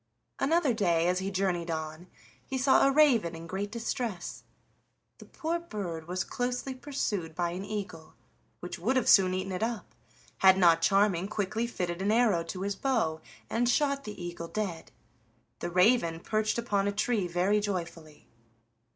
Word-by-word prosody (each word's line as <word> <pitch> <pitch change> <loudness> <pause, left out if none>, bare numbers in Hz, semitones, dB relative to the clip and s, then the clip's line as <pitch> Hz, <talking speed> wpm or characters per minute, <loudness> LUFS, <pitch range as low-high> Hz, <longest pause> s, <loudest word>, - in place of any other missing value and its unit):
Another 315 -3 +2
day, 175 -6 +2
as 180 +1 +1
he 190 +1 -2
journeyed 185 -3 -1
on, 160 +1 -5 0.4
he 265 - -4
saw 265 +1 +4
a - - +3
raven 250 - +4
in 165 0 -9
great 195 +4 -4
distress. 225 -5 -4 0.8
The - - -12
poor 335 +1 -3
bird 185 - -6
was 180 +1 -2
closely 250 +2 -3
pursued 215 - -3
by 175 0 -1
an 180 +2 -5
eagle, 195 -6 -6 0.5
which 180 - -6
would 255 +6 +1
soon 190 -2 +7
have 185 - -2
eaten 190 +1 -4
it 185 - -3
up, 230 -1 -3 0.5
had 190 0 +6
not 170 -3 +5
Charming 195 0 +3
quickly 215 +3 -2
fitted 180 -5 -3
an 200 +2 +1
arrow 220 -7 +3
to 185 +2 -5
his 200 0 -2
bow 205 -11 0 0.3
and 240 +1 +1
shot 280 0 +1
the 210 -2 -7
eagle 175 -1 -6
dead. 185 -4 -4 0.7
The - - -3
raven 180 -2 +3
perched 215 +4 -1
upon 205 -4 0
a - - +1
tree 210 -1 0
very 180 +4 +2
joyfully. 170 -6 -5
195 Hz, 165 wpm, -29 LUFS, 175-235 Hz, 0.8 s, soon